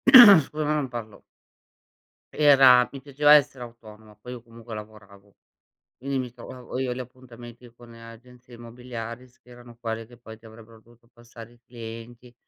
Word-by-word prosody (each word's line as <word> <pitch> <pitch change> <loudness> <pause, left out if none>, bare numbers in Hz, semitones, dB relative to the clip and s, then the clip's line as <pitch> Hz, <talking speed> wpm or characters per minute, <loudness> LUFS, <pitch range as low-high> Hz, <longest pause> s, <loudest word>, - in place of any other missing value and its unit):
scusa 165 - +8
ma 150 +1 -1
non 145 -3 -2
parlo. 115 -3 -9 1.1
Era 135 -4 +5
mi 135 - -9
piaceva 145 +2 +3
essere 140 -4 +2
autonoma, 110 -2 -16
poi 125 +4 -12
io 125 - -9
comunque 115 -1 -13
lavoravo. 105 -2 -13 0.6
Quindi, 135 +1 -4
mi 125 -1 -5
trovavo 125 +1 -10
io 130 -2 -2
gli 125 - -6
appuntamenti 120 -1 -13
con 120 -1 -16
agenzie 120 +2 -15
immobiliari, 120 0 -9
s 125 - -29
che - - -27
erano 120 -1 -16
quelle 115 -1 -5
che 120 0 -18
poi 110 -2 -13
ti 115 - -29
avrebbero 110 0 -16
dovuto 120 +1 -25
passare 120 -1 -15
i 120 - -25
clienti, 120 +1 -11
120 Hz, 165 wpm, -24 LUFS, 115-125 Hz, 1.1 s, scusa